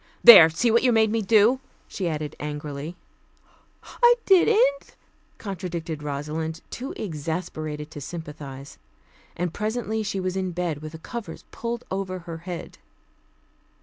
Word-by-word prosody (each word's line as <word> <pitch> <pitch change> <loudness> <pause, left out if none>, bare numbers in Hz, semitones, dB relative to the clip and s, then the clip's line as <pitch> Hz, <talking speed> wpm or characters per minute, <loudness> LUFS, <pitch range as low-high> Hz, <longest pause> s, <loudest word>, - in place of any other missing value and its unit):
"There! 195 -9 +11
see 225 +9 +1
what 235 - +4
you 255 - +3
made 220 -2 +3
me 225 0 +1
do," 220 +5 +4 0.3
she 185 -3 -3
added 150 -2 -4
angrily. 150 +2 -5 1.1
"I 480 0 +7
didn't," 455 +6 +3 0.4
contradicted 170 -5 -5
Rosalind, 150 +3 -4
too 260 +3 -5
exasperated 155 -3 -4
to 145 - -8
sympathize; 145 -3 -8 0.6
and 175 -1 -2
presently 220 +1 -2
she 200 -2 -3
was 185 0 -2
in 185 -2 -2
bed, 170 -4 -2
with 155 0 -8
the - - -7
covers 235 +6 -8
pulled 235 0 -4
over 190 -1 -3
her 170 -2 -8
head. 175 - -7
180 Hz, 135 wpm, -25 LUFS, 155-220 Hz, 1.1 s, There